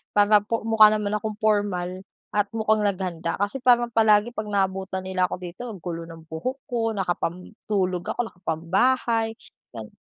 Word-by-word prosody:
para 205 0 +6
po 220 +2 -3
mukha 220 -1 +7
naman 210 -1 -1
akong 215 0 -4
pormal 195 -4 0 0.3
at 205 -1 +1
mukhang 220 -1 +2
naghanda 180 -4 -1
kasi 205 +6 -1
parang 240 -1 +4
palagi 220 0 +4
'pag 215 -1 -4
naabutan 190 -1 -1
nila 185 -1 0
ako - - -4
dito, 180 +5 -8
ang 205 -5 -7
gulo 170 -2 -4
ng 165 -1 -11
buhok 255 +13 -4
ko, 230 -3 -1
nakapantulog 185 0 -2
ako, - - -23
nakapambahay, 225 +7 0 0.4
gan 110 -2 -9
205 Hz, 155 wpm, -24 LUFS, 180-220 Hz, 0.4 s, mukha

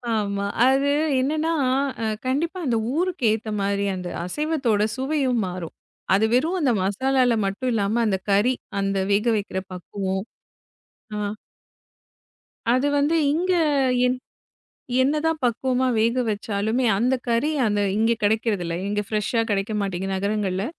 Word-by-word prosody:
ஆமா. 200 -1 -1 0.2
அது 270 +2 +3 0.3
என்னன்னா 310 +5 0 0.5
அ - - 0 0.2
கண்டிப்பா 320 +8 -1
அந்த 235 -3 +1 0.2
ஊருக்கேத்த 235 - 0
மாரி 200 0 0
அந்த 180 -1 -5 0.2
அசைவத்தோட 265 - 0
சுவையும் 265 -3 0
மாறும். 180 -2 -6 0.4
அது 215 +3 +3
வெறும் 320 +9 +2
அந்த 265 -4 +3
மசாலால 255 +5 +2
மட்டும் 205 +7 -2
இல்லாம 215 +2 +1
அந்தக் 190 -3 -1
கறி, 215 +6 +4 0.3
அந்த 195 0 0
வேகவைக்கிற 210 -2 +1
பக்குவொம் 190 +2 -4 0.9
அ. 210 +1 -3 1.3
அது 255 +3 +2
வந்து 300 +4 +2 0.2
இங்க 365 +3 +1 0.5
என் 250 0 0 0.9
என்னதான் 305 +3 +1
பக்குவமா 255 +2 +1
வேக 235 +3 +2
வச்சாலுமே 215 +3 -1
அந்தக் 250 +3 +1
கறி 235 +6 +2 0.2
அத 205 -1 +1 0.2
இங்க 225 +2 +3
கிடைக்கறதில்ல. 205 -5 0
இங்க 205 0 0
ஃபிரெஷ் 210 -2 -1
அ - - +3
கிடைக்க 200 +2 0
மாட்டேங்கிது 195 0 -2
நகரங்கள்ல. 200 -1 -1
225 Hz, 125 wpm, -23 LUFS, 200-265 Hz, 1.3 s, கறி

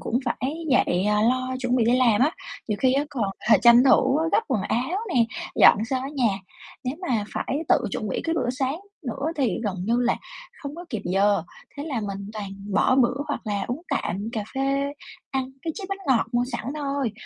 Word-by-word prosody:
cũng 240 - 0
phải 255 +3 -2 0.2
dậy, 185 -7 +3
à, 210 0 +2
lo 255 +2 +1
chuẩn 250 -1 +1
bị 240 - +3
đi 240 +3 +4
làm 240 -4 +4
á, 285 +5 +4 0.4
nhiều 210 -2 -1
khi 260 -1 +4
á 280 +2 +2
còn, 250 -7 -1 0.3
ờ, - - +8
tranh 240 +1 +8
thủ 265 +1 +4
gấp - - +5
quần 255 -7 +1
áo 260 - -1 0.2
nè, 235 - +5 0.3
dọn 210 - +6
sơ 260 +3 -1
cái 275 +2 -5
nhà. 230 -8 +1 0.5
Nếu 255 +3 -2
mà 225 -5 +1
phải 275 - -2
tự - - +6
chuẩn 215 - -3
bị - - -2
cái 330 - 0
bữa 255 -6 0
sáng 265 +4 -2 0.3
nữa 270 +5 -3
thì 255 -9 +1
gần 195 -3 -1
như 230 +4 +2
là 245 -1 +2 0.5
hông 280 +1 -5
có 345 +2 -8
kịp 225 - -3
giờ, 195 0 +2 0.3
thế 285 - -4
là 275 -7 -2
mình 200 -1 -5
toàn 210 -2 -5 0.3
bỏ 260 - +4
bữa 245 -1 +4
hoặc 290 - -2
là 200 -2 -1
uống 255 +7 -3
tạm 210 -6 -2
cà 220 -3 -2
phê, 275 +1 0 0.4
ăn 265 -1 -2
cái 320 - -2
chiếc 400 - -6
bánh 390 0 -3
ngọt 260 -5 +3
mua 240 0 +2
sẵn 235 - -3
thôi. 280 -5 -2
250 Hz, 220 wpm, -25 LUFS, 220-275 Hz, 0.5 s, ờ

